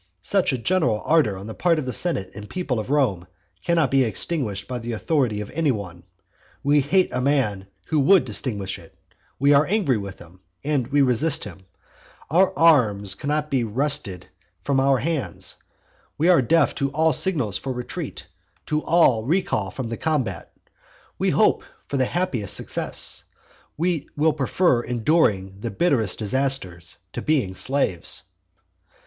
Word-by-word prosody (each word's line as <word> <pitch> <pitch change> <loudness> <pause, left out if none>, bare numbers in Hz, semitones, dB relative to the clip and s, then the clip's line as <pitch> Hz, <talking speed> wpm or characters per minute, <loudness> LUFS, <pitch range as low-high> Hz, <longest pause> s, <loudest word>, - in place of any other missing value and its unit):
Such 195 - +1
a 130 - -1
general 125 -5 +1
ardour 150 -12 +3
on 95 - -8
the 110 - -6
part 170 +4 +1
of 155 - -2
the 125 - -3
senate 100 - -1
and 105 +1 -10
people 145 -10 -2
of 110 - -5
Rome 115 -12 +1 0.4
cannot 165 -6 +2
be 135 -1 +4
extinguished 110 - -2
by 125 -1 -4
the 120 0 -5
authority 115 -3 0
of 105 - -8
any 155 +1 0
one: 95 -8 -4 0.6
we 145 +1 +4
hate 180 +7 +2
a 125 - -1
man 125 -9 0 0.2
who 155 - 0
would 145 0 +5
extinguish 100 -4 -3
it; - - -18 0.4
we 140 +2 +4
are 145 +1 +4
angry 180 - +1
with 100 -2 -7
him, 85 +2 -16 0.2
and 140 -4 -1
resist 145 +3 +2
him; 95 -1 -11 0.6
our 185 +4 +4
arms 110 - +4
cannot 150 +1 -2
be 130 -3 +1
wrested 110 -6 -2 0.4
from 135 +3 +1
our 135 0 +3
hands; 150 +2 -3 0.6
we 165 +4 +2
are 175 -6 +6
deaf 155 +4 +3
to 140 - -1
all 160 +2 +2
signals 135 - +1
for 135 - -4
retreat, 125 -1 -6 0.4
to 150 0 -1
all 145 -10 +3
recal 130 - 0
from 130 +4 -5
the 115 - -4
combat. 150 -7 -2 0.7
We - - +2
hope - - +3 0.2
for 140 - -2
the 130 - +2
happiest 130 - -2
success; - - -1 0.5
we 170 -1 -1
will 155 +1 +3
prefer 140 -1 +1
enduring 110 - +1
the 115 - -4
bitterest 115 - 0
disaster 115 -6 0 0.3
to - - -4
being 135 -12 0
slaves. 105 -6 0
135 Hz, 160 wpm, -23 LUFS, 105-155 Hz, 0.7 s, are